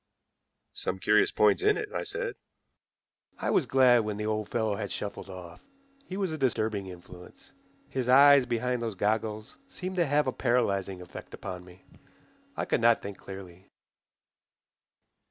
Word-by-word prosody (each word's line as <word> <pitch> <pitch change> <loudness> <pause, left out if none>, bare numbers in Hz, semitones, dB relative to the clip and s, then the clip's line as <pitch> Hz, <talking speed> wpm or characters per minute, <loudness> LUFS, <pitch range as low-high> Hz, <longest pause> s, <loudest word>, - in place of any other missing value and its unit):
"Some - - -3
curious 410 0 +3
points 405 - +3
in 420 +1 +3
it," 425 -1 -4
I - - -1
said. - - -3 1.0
I - - -1
was 145 - +2
glad 125 -1 +5
when 105 -2 -2
the 105 - -3
old 110 -1 -2
fellow 110 -3 0
had 100 0 -5
shuffled 100 -1 -5
off. 90 -2 -10 0.5
He 190 - -5
was 190 -4 -1
a 155 - -5
disturbing 110 -6 0
influence. 90 0 -13 0.4
His 130 -2 -3
eyes 140 0 +7
behind 125 +1 -1
those 115 -3 -3
goggles 105 +2 -2
seemed 185 -7 -6
to 170 -3 +2
have 145 +2 +2
a 130 - 0
paralyzing 100 -7 0
effect 90 - -10
upon 90 -2 -7
me. 90 +1 -17 0.7
I - - -1
could - - 0
not 115 0 +4
think 100 -1 -7
clearly. 95 -1 -11
110 Hz, 155 wpm, -28 LUFS, 100-135 Hz, 1.0 s, eyes